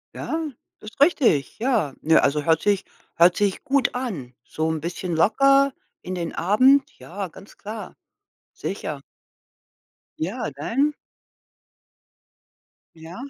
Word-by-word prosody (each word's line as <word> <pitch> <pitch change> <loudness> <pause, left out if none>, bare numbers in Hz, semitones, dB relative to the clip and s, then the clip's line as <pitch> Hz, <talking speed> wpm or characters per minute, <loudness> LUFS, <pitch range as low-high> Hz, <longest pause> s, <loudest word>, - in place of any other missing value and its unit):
Ja. 320 -1 -3 0.3
Das 215 - -9
richtig. 270 - +3
Ja, 225 - +1
nö, 160 +1 +4
also 145 +1 +2
hört 160 +1 +2
sich 205 -2 +1 0.3
hört 175 +1 +5
sich 200 -2 0
gut 280 -3 +1
an. 185 - -4
So 160 0 -3
'n 160 -1 -2
bisschen 175 +1 -4
locker 275 +10 +4 0.3
in 185 +1 -5
den 170 -2 -4
Abend. 255 +10 +4
Ja, 195 +2 -6
ganz 190 +4 -15
klar. 215 +1 -8 0.6
Sicher. 155 -7 -5 1.2
Ja, 195 +8 -3
dein 255 - 0 2.0
Ja. 165 +2 -11
195 Hz, 115 wpm, -23 LUFS, 160-255 Hz, 2.0 s, hört